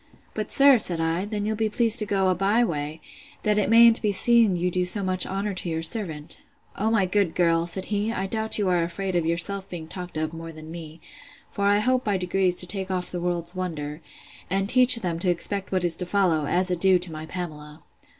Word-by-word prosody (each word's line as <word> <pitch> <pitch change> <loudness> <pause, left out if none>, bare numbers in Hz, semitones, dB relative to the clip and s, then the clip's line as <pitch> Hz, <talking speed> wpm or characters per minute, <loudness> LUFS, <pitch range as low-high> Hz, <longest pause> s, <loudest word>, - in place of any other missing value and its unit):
But, 215 -1 -5
sir, 275 -3 +6
said 175 -6 +2
I, 165 +3 -1
then 205 -1 -4
you'll 215 +1 -1
be 220 0 -1
pleased 230 +1 +4
to 210 - +2
go 195 -2 +1
a - - +3
bye 200 +6 +1
way, 155 -5 -4 0.4
that 210 0 +2
it 205 - 0
mayn't 230 0 +6
be 210 - +1
seen 225 0 +4
you 180 +1 -1
do 180 +1 0
so 190 +3 -1
much 185 -1 -1
honor 195 +2 -3
to 180 -1 -3
your 160 0 -3
servant. 165 - -1 0.3
O 215 +2 -1
my 220 -4 +2
good 185 -2 0
girl! 165 -1 +1
said 185 +2 -3
he, 205 +2 -1
I 195 -4 -3
doubt 220 +2 -1
you 205 -2 -1
are 180 -2 +1
afraid 180 +3 -4
of 170 -2 0
yourself 190 +4 -1
being 165 -4 -8
talked 180 -1 -8
of, 155 +1 -3
more 165 0 -8
than 155 0 -12
me: 165 -1 -10 0.5
for 200 - -3
I 205 0 +4
hope 255 +4 +1
by 205 -2 0
degrees 180 0 0
to 180 - +1
take 190 +1 -5
off 180 -1 -3
the 175 - -5
world's 175 -1 -2
wonder, 160 -5 -5 0.5
and 195 +1 0
teach 255 +2 +7
them 175 -7 -4
to 180 - 0
expect 190 +3 -1
what 185 -2 0
is 170 -2 +3
to 180 - -5
follow, 175 -6 +1
as 180 +1 0
a - - +1
due 190 +1 +3
to 175 -1 -2
my 155 0 -8
Pamela. 155 -4 -8
185 Hz, 235 wpm, -24 LUFS, 170-205 Hz, 0.5 s, teach